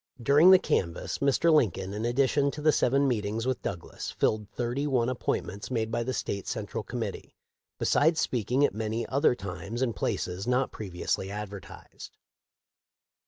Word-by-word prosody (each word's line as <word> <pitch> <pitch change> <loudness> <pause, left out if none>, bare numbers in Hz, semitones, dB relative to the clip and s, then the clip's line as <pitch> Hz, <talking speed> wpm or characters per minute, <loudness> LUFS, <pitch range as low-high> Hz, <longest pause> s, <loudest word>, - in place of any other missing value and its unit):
During 145 +8 +6
the 190 - +10
canvass 85 - -1
Mr. 140 +4 +3
Lincoln, 95 - +1
in 105 +2 -3
addition 140 +3 +2
to 150 - -6
the 155 - +6
seven 140 +1 +2
meetings 110 -2 -1
with 130 -1 -1
Douglas, 85 -3 -5
filled 105 -1 0
thirty 125 +4 -2
one 125 -4 +1
appointments 105 -5 -3
made 115 -3 -1
by 120 - 0
the 125 +2 -2
State 100 -5 -3
Central - - -3
Com - - -5
mittee, - - -6 0.4
besides 160 +3 +3
speaking 125 +4 +1
at - - -1
many 110 +2 -2
other 140 -1 +2
times 100 +2 -6
and 120 -4 0
places 90 +3 -2
not 125 +1 +1
previously 95 -1 -3
advertised. 105 -1 -9
120 Hz, 160 wpm, -28 LUFS, 100-135 Hz, 0.4 s, the